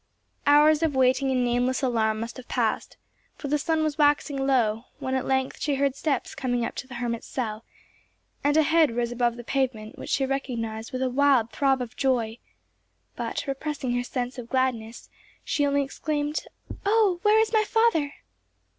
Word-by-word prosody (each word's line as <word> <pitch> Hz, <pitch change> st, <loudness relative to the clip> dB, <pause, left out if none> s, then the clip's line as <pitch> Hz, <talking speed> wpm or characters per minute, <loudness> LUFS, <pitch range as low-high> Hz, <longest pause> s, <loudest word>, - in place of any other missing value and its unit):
Hours 300 Hz, +2 st, +6 dB
of 320 Hz, -4 st, +1 dB
waiting 260 Hz, +1 st, +3 dB
and 255 Hz, -1 st, +1 dB
nameless 245 Hz, +2 st, 0 dB
alarm 220 Hz, -4 st, +1 dB
must 230 Hz, +3 st, -6 dB
have 255 Hz, -, -10 dB
passed, -, -, -1 dB, 0.4 s
for 285 Hz, -, -6 dB
the 295 Hz, +1 st, +2 dB
sun 320 Hz, +1 st, 0 dB
was 310 Hz, 0 st, -2 dB
waxing 290 Hz, -2 st, +2 dB
low, 230 Hz, -4 st, +2 dB
when 260 Hz, -, -3 dB
at 260 Hz, -, -1 dB
length 265 Hz, 0 st, 0 dB
she 290 Hz, -2 st, +1 dB
heard 275 Hz, -1 st, +1 dB
steps 280 Hz, -2 st, -1 dB
coming 245 Hz, -2 st, -1 dB
up -, -, -4 dB
the 260 Hz, -1 st, -7 dB
hermit's 235 Hz, -1 st, -3 dB
cell, 220 Hz, -4 st, -4 dB, 0.8 s
and 290 Hz, +2 st, +3 dB
a 315 Hz, -, +6 dB
head 320 Hz, -5 st, +3 dB
rose 240 Hz, 0 st, -1 dB
above 240 Hz, -1 st, +1 dB
the 240 Hz, -, -8 dB
pavement 240 Hz, -5 st, -2 dB
which -, -, -7 dB
she 270 Hz, -, +1 dB
recognized 230 Hz, -5 st, -3 dB
with 255 Hz, 0 st, -2 dB
a 260 Hz, -, +1 dB
wild 265 Hz, -4 st, +3 dB
throb 270 Hz, -2 st, +1 dB
of 240 Hz, -, -10 dB
joy, 240 Hz, -4 st, 0 dB, 0.8 s
but, -, -, -3 dB
repressing 275 Hz, -2 st, -3 dB
her 245 Hz, -, +1 dB
sense 250 Hz, +1 st, -4 dB
of 235 Hz, -1 st, -8 dB
gladness, 245 Hz, -4 st, -1 dB, 0.4 s
she 290 Hz, -2 st, +1 dB
only 280 Hz, 0 st, +2 dB
exclaimed, 295 Hz, +2 st, -3 dB, 0.4 s
"Oh, 405 Hz, -3 st, +3 dB
where 420 Hz, +2 st, +5 dB
is 445 Hz, 0 st, +1 dB
my 435 Hz, -1 st, +4 dB
father!" 425 Hz, -11 st, +2 dB
265 Hz, 180 wpm, -26 LUFS, 240-290 Hz, 0.8 s, Hours